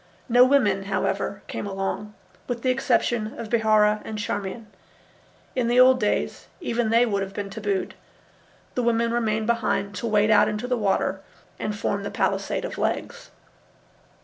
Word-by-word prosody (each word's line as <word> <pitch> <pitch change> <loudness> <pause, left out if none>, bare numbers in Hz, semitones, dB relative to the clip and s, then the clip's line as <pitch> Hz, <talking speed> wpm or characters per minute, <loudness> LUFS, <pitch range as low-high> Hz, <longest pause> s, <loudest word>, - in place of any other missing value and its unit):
No 245 0 +6
women, 210 -8 +3
however, 195 0 -2
came - - -5
along, 200 +2 -4 0.3
with 240 -2 -4
the 255 - +3
exception 240 -3 0
of 225 - -6
Bihaura 215 -2 +3
and 215 - -6
Charmian. 210 +1 -4 0.9
In 250 -3 +1
the 240 +1 +3
old 255 0 +7
days 210 -2 -1
even 235 - -1
they 230 +2 +4
would 200 -4 -1
have 195 0 -5
been 200 -1 -4
tabooed. 200 -2 -2 0.8
The 250 - 0
women 235 -1 +1
remained 220 -2 0
behind 230 -3 0
to 235 - -3
wade 215 0 +3
out 210 - +6
into 210 +3 -3
the 250 - +1
water 195 -3 0 0.4
and 210 -1 -3
form 200 -2 -1
the 200 - -4
palisade - - -1
of - - -6
legs. - - -3
215 Hz, 160 wpm, -24 LUFS, 205-235 Hz, 0.9 s, old